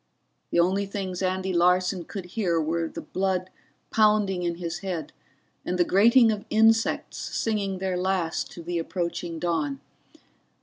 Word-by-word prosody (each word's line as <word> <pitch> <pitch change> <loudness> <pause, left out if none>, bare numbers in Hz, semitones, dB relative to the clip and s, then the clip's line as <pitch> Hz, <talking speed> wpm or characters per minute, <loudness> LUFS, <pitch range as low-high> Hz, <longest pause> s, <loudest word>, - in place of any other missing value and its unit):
The - - +1
only 190 +3 +2
things 190 -2 -4
Andy 190 0 -1
Larson 180 +1 +2
could 195 -3 -6
hear 180 -7 +1
were 165 +1 -1
the - - -7
blood 185 -1 -1 0.4
pounding 210 -4 +3
in 170 -1 -1
his 170 -1 -4
head 180 -6 -4 0.5
and 180 - -2
the 175 - +5
grating 230 +5 +5
of 205 -1 -3
insects 225 +1 +2
singing 200 -4 -2
their 185 -1 -2
last 180 -3 -1
to 170 - -9
the 170 0 -2
approaching 170 0 -3
dawn. 155 -5 -1
185 Hz, 145 wpm, -26 LUFS, 170-195 Hz, 0.5 s, the